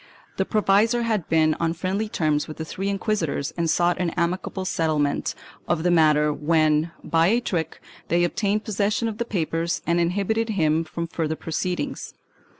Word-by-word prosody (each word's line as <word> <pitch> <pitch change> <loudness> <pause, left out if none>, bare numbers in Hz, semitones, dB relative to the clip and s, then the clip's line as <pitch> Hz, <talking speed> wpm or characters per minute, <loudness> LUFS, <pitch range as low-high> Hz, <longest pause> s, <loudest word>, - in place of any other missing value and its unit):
The 190 - +1
provisor 215 +3 +3
had 215 -7 -1
been 155 -1 +3
on 165 -1 +1
friendly 195 +5 -2
terms 155 -7 0
with 155 - -8
the 160 - -4
three 195 +4 -3
inquisitors 195 -8 -1
and 170 -1 0
sought 175 +2 +2
an 180 -2 +1
amicable 180 +2 -1
settlement 155 -5 0 0.3
of 160 - 0
the 175 - +3
matter 150 -2 +4
when, 155 +1 +2
by 165 0 +3
a 230 +5 +3
trick, 170 -9 -3 0.3
they 175 +1 +2
obtained 205 +4 0
possession 215 +3 0
of 220 -1 -5
the 235 - 0
papers 170 -3 -2
and 170 0 +2
inhibited 200 +6 0
him 160 -5 +2
from 170 +1 -5
further 160 -1 -2
proceed 175 +3 -2
ings. - - -6
170 Hz, 170 wpm, -24 LUFS, 160-200 Hz, 0.3 s, matter